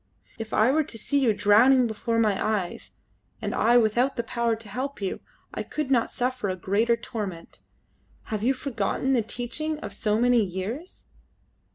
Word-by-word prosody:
If 225 -1 -6
I 220 +4 +4
were 310 +3 +2
to 235 - -8
see 280 +6 0
you 255 -5 +3
drowning 235 +6 +5
before 230 +1 -2
my 215 -4 +2
eyes, 205 -5 -2 0.5
and - - -3
I 235 +2 +4
without 240 +4 +2
the 235 - -2
power 235 0 0
to 225 -1 -13
help 260 +7 -4
you, 195 -2 -3 0.3
I - - -3
could 300 -3 -4
not 235 -3 +3
suffer 250 -4 -2
a 185 - -1
greater 210 +6 +1
torment. 195 -9 -6 0.7
Have 210 - -1
you 260 +5 +2
forgotten 260 0 -1
the 245 - +3
teaching 255 +8 -3
of 205 - -6
so 210 +1 0
many 245 -1 +4
years?" 205 - -5
230 Hz, 175 wpm, -26 LUFS, 210-255 Hz, 0.7 s, drowning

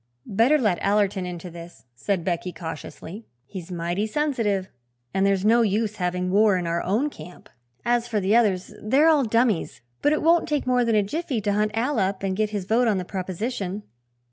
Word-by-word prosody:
"Better 230 +9 +3
let 210 -10 +1
Allerton 200 -2 +1
into 175 0 -7
this," 170 -2 -12
said 170 +9 -2
Becky 180 +1 -2
cautiously. 165 +5 -8 0.2
"He's 185 +3 -9
mighty 175 +4 -2
sensitive 220 -8 -1 0.5
and 195 +1 +2
there's 195 0 +1
no 230 +2 +5
use 215 0 0
having 180 -1 -1
war 205 0 +4
in 180 - -3
our 170 0 -1
own 235 +11 0
camp. 175 - -12 0.4
As 240 0 +1
for 220 -3 0
the 200 +3 +2
others, 200 -6 +2
they're 275 +9 +4
all 300 -3 +4
dummies; 230 -4 0 0.2
but 290 - +3
it 305 - 0
won't 335 0 +3
take 295 -2 0
more 250 -1 +2
than 230 -2 +1
a 210 - +4
jiffy 275 - -3
to 205 0 0
hunt 210 +1 +1
Al 250 +2 0
up 190 0 -1
and 190 -1 -1
get 215 +1 0
his 205 -3 -4
vote 235 +4 +2
on 210 -3 +2
the 180 - -3
proposition." 195 +2 -4
205 Hz, 195 wpm, -24 LUFS, 185-235 Hz, 0.5 s, no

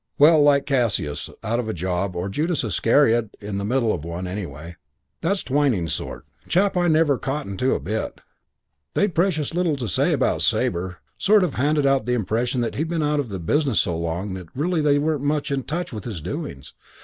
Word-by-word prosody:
Well, 155 +1 +7
like 140 -1 +4
Cassius 115 - 0
out 115 +2 0
of 115 -3 -3
a - - -2
job 90 +2 -2
or 90 +2 -2
Judas 155 - -1
Iscariot 115 +1 +2
in 100 -1 -4
the - - -3
middle 115 +1 +1
of 80 - -4
one, 85 +2 -5
anyway. 85 -4 -6 0.5
That's 195 +4 0
Twyning's 130 - +1
sort. - - -5 0.2
Chap 195 +3 +2
I 175 -1 +2
never 155 -4 +3
cottoned 135 -8 -4
on 130 - +3
to - - +3
a - - -2
bit. 110 +3 -4 0.8
They'd 205 -3 +2
precious 165 -3 +1
little 175 -3 +1
to 125 -4 -4
say - - +2
about - - +1
Sabre. 90 +1 0 0.2
Sort 210 0 +5
of 170 -6 -1
handed 145 +2 +1
out 135 -4 +2
the 125 - +2
impression 120 +3 0
that 115 - -1
he'd 160 +3 -2
been 165 -2 0
out 150 0 +1
of 135 -5 -2
the 95 - -4
business 135 - +1
so 85 - -2
long 85 +4 -3
that 90 -2 -7
really 165 +4 0
they 145 -1 +3
weren't 150 -1 0
much 145 0 -1
in 135 -1 0
touch 170 -2 -3
with 105 -3 -6
his 105 -8 -4
doings. 70 -2 -6
125 Hz, 210 wpm, -23 LUFS, 95-150 Hz, 0.8 s, Well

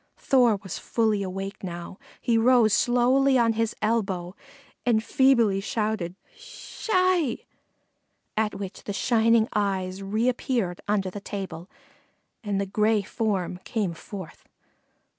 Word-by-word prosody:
Thor 245 -5 +3
was 190 - -6
fully 220 -3 0
awake 195 +1 -5
now; 175 0 -7 0.2
he 235 -2 +1
rose 230 -2 +4
slowly 255 +4 +3
on 230 -2 +3
his 225 0 -1
elbow 195 -5 -1 0.5
and 225 -3 +2
feebly 235 -8 +3
shouted 210 -4 -2 0.2
"Sssh - - -11
hi," 365 - +3 1.0
at 215 -1 0
which 195 -1 -7
the 205 - -3
shining 230 0 +3
eyes 190 -2 -1
reappeared 220 -2 -1
under 200 -2 0
the 205 - -7
table 190 -4 -6 0.7
and 205 -2 -1
the 200 - 0
gray 210 +1 +1
form 190 -4 -2
came 205 -7 -2
forth. 185 +1 -10
215 Hz, 125 wpm, -26 LUFS, 195-235 Hz, 1.0 s, rose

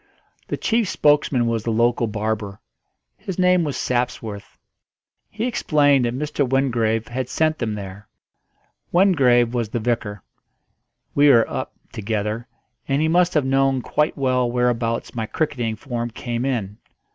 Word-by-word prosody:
The - - -3
chief 225 -3 0
spokesman 145 -7 +2
was 115 -1 0
the 115 - -2
local 115 +1 +2
barber; 105 -1 -3 0.6
his 190 - -6
name 180 -1 +3
was 145 -3 -3
Sapsworth. 115 -4 -3 0.7
He 220 +3 -3
explained 145 - +2
that 120 +1 -2
Mr. 150 0 -1
Wingrave 115 -4 +1
had 125 +1 -3
sent 155 0 0
them 110 -3 -2
there. 100 0 -8 0.8
Wingrave 130 - +4
was 120 -3 -1
the 120 - -2
vicar; 110 -3 -2 0.9
we 145 +1 +5
were 115 -4 +5
"up" - - -5 0.2
together, 110 +2 -3 0.4
and 135 0 +1
he 155 - +2
must 175 +2 +2
have 150 -3 +2
known 135 -1 +2
quite 150 +1 0
well 130 -2 +1
whereabouts 120 -1 -1
my 110 -2 -3
cricketing 120 -7 -2
form 120 -1 -4
came 120 +1 -4
in. 105 -7 -3
120 Hz, 145 wpm, -22 LUFS, 115-145 Hz, 0.9 s, we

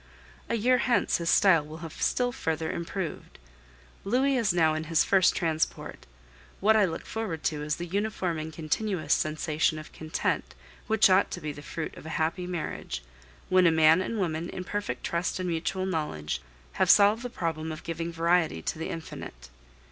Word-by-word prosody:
A - - +1
year 250 +3 +3
hence 240 -1 +2
his 170 -1 -2
style 180 -5 +5
will 155 +1 -9
have 160 - -9
still 245 -1 +1
further 160 -7 -2
improved. 170 0 -5 0.7
Louis 260 +7 +2
is 230 -6 +2
now 165 -3 +3
in 155 0 -3
his 165 0 +3
first 190 -2 +4
transport; 160 -2 -2 0.5
what 220 +2 +4
I 210 -2 +5
look 165 -3 -5
forward 200 -9 -4
to 150 -2 -1
is 150 0 -1
the 175 - -5
uniform 190 -3 -2
and 155 +1 -5
continuous 160 +1 -1
sensation 155 0 0
of 155 - -10
content 155 - -2 0.3
which 220 -1 +5
ought 185 +2 +4
to - - -5
be 155 -3 -4
the 145 - -10
fruit 155 +1 -5
of - - -10
a 160 - -3
happy 165 +3 -1
marriage, 155 - -4 0.4
when 185 -1 +5
a - - +5
man 160 +2 +5
and 225 +4 -3
woman, 170 -3 -2
in 185 - -5
perfect 200 -10 -4
trust 170 +2 -1
and 185 - -2
mutual 170 +3 -1
knowledge, 150 - -2 0.4
have - - +4
solved 205 +3 +6
the 245 - -4
problem 160 -7 -3
of 155 - -7
giving 165 0 -4
variety 165 - +1
to - - -3
the 165 - -3
infinite. 145 - -8
165 Hz, 185 wpm, -28 LUFS, 155-190 Hz, 0.7 s, solved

